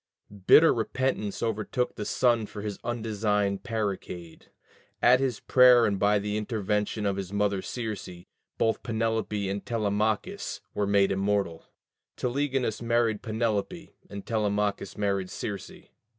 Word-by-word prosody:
Bitter 160 +1 +8
repentance 115 -2 -2
overtook 115 +2 -1
the 105 - -5
son 120 -3 +2
for 105 - -8
his 105 -2 -4
undesigned 105 -4 -1
parricide: 95 -7 -4 0.5
at 125 +1 +5
his 130 -5 -1
prayer 125 -2 +6
and 100 -2 0
by 105 +1 +3
the 105 +1 -2
intervention 105 -1 -1
of 100 -1 0
his 95 -1 -5
mother 100 -1 0
Circe, 110 -1 -5 0.5
both 115 - +1
Penelope 110 -3 -1
and 100 +1 -3
Telemachus 110 - -1
were 105 -1 -1
made 100 -1 +3
immortal: 95 -4 -1 0.5
Telegonus 130 -3 -1
married 115 -2 +1
Penelope, 110 - -2 0.2
and 100 -1 -8
Telemachus 105 -3 -1
married 100 -2 -1
Circe. 100 -2 -5
105 Hz, 125 wpm, -27 LUFS, 100-115 Hz, 0.5 s, Bitter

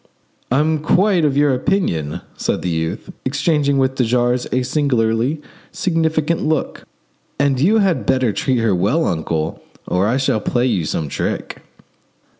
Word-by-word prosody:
"I'm 155 +4 +2
quite 180 +3 +2
of 140 -2 +1
your 145 -2 +3
opinion," 125 - -1
said - - -2
the 90 - -1
youth; 80 +4 -3
exchanging 140 +1 +1
with 130 -1 +2
de 130 - 0
jars 120 +1 +1
a 130 0 +1
singularly 125 0 0 0.3
significant 160 -2 0
look; 155 -1 -2 0.5
"and 140 -2 +1
you 195 +11 +4
had 175 - +1
better 130 -5 +2
treat 130 +4 0
her 115 -3 +2
well, 105 - +1
uncle, 80 -1 -2 0.3
or 90 +3 +1
I 120 +4 +1
shall 135 -5 +1
play 120 +3 0
you 90 -10 0
some 75 0 -2
trick." - - -4
130 Hz, 150 wpm, -19 LUFS, 110-155 Hz, 0.5 s, you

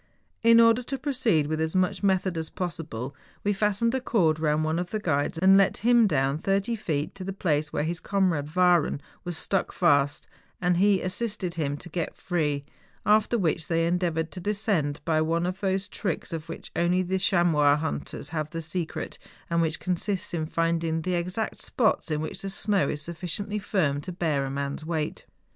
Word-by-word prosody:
In 230 0 +7
order 230 +1 +6
to 270 +2 -4
proceed 250 - +1
with 155 +1 -2
as 160 +2 -1
much 185 -1 +1
method 190 -2 +1
as 160 -1 -3
THE - - -32
GALENSTOCK. - - -15
95 185 - +2 0.3
possible, 125 +5 -5 0.3
we 205 - +2
fastened 210 +3 +1
a 260 - 0
cord 170 - +2
round 155 0 +1
one 160 +2 0
of 175 0 -3
the 215 - -2
guides 160 -6 0
and 190 +3 +6
let 195 - +3
him 240 -2 +6
down 140 -3 +1
thirty 195 +6 0
feet 150 -8 -2
to 195 - -7
the 195 - -3
place 155 -6 0
where 145 - -1
his 170 +2 -2
comrade 180 -7 0
Wahren 180 -5 +4 0.2
was 175 -3 -4
stuck 195 - -1
fast; 145 -4 +2 0.3
and 180 -1 +2
first - - +2
he 200 -2 +4
as¬ 185 - -2
sisted 205 -4 -3
him 145 -4 -2
to 175 - -7
get 170 -1 -3
free, 150 -5 -1 0.4
after 215 +3 +4
which 165 -5 0
they 165 -1 +1
endeavoured 170 -2 0
to 185 - -7
descend 195 -7 0
by 155 -1 +2
one 165 +2 +1
of 185 +1 -3
those 195 0 0
tricks 185 -4 -3
of 160 -1 -5
which - - -8
only 180 +2 +2
the 190 +1 -1
chamois 165 -7 +4
hunters 150 -1 -4
have 155 -2 -3
the 165 +1 -5
secret, 165 +1 -4 0.3
and 170 0 +3
which 160 0 0
consists 185 +1 -2
in 160 -2 -1
finding 165 -1 0
the 185 - -1
exact 180 +5 -2
spots 220 -7 +1
in 155 -1 -1
which 155 - -4
the 195 - -4
snow 195 -5 +1
is 150 0 -3
suffi¬ 170 +2 -6 0.2
ciently 210 0 -3
firm 155 -9 0
to 180 - -6
bear 155 -6 0
a - - -3
man's 140 +2 -3
weight. 155 -2 -3
175 Hz, 205 wpm, -27 LUFS, 155-195 Hz, 0.4 s, In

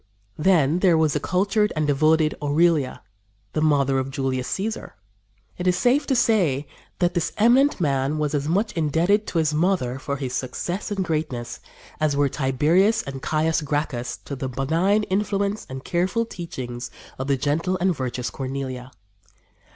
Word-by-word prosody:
" 100 0 -40
Then 165 -2 +3
there 180 -3 +4
was 155 -2 +2
the 150 - 0
cultured 200 +6 +1
and 155 0 0
devoted 155 +2 +3
Aurelia, 150 -1 +1 0.5
the 155 - 0
mother 140 -3 +3
of 130 0 -3
Julius 135 -2 -2
Cæsar. 215 - -3 0.7
It 180 - -1
is 180 0 +3
safe 255 +8 +2
to 270 - +2
say 175 - +2 0.3
that 175 -1 +1
this 170 -2 -1
eminent 250 +6 +4
man 140 -2 0
was 150 -1 -1
as 145 0 -1
much 200 +7 +1
indebted 170 +7 +1
to - - -3
his 155 -2 +2
mother 150 -6 0
for 140 0 -3
his 130 -2 -4
success 175 +10 -3
and 195 -3 -2
greatness 150 -8 -3 0.4
as 155 -2 +1
were 145 -1 +3
Tiberius 160 - +2
and 135 -1 -7
Caius 160 +2 +1
Gracchus 145 -4 -2
to 140 - -5
the 130 0 -4
benign 165 - +1
influence 200 +1 -1
and 130 0 -7
careful 185 +7 0
teachings 130 - -6 0.3
of 130 - -3
the 140 -1 +2
gentle 160 +7 0
and 185 -1 +2
virtuous 125 -3 -3
Cornelia. 130 0 -5
155 Hz, 165 wpm, -23 LUFS, 135-185 Hz, 0.7 s, there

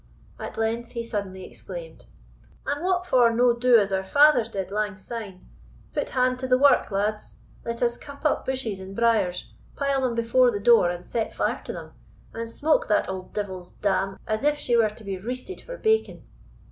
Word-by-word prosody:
At - - -7
length 230 +1 -2
he 235 -1 -3
suddenly 200 -4 -5
exclaimed, - - -10 0.6
"And 290 +3 -2
what 365 0 +1
for 250 -8 +5
no 240 +1 +3
do 245 0 +5
as 200 -2 +1
our 190 0 0
fathers 285 +1 +5
did 195 -3 -4
lang 210 -1 -2
syne? 210 -3 -8 0.5
Put - - -2
hand 255 0 +1
to 260 - -3
the 255 0 +4
wark, 280 +1 +4
lads. 210 +1 -2 0.2
Let 235 +1 -3
us 240 0 +1
cut 285 +1 -12
up 305 - +2
bushes 255 -7 -3
and 190 +1 -9
briers, 215 -6 +1 0.2
pile 275 -1 0
them 250 -3 0
before 235 +2 +4
the 205 -4 -2
door 215 -4 +5
and 175 0 -5
set 225 -2 -2
fire - - -1
to - - -5
them, - - -8 0.4
and 230 0 -5
smoke 300 +6 +1
that 210 -2 +2
auld 185 -1 -6
devil's 190 -4 -5
dam 195 -1 -1
as 215 +3 -2
if 295 0 +2
she 245 -4 0
were 225 -2 +4
to 215 +1 -14
be 195 -2 -4
reested 255 - -6
for - - -8
bacon." 440 -1 +1
230 Hz, 195 wpm, -25 LUFS, 200-255 Hz, 0.6 s, for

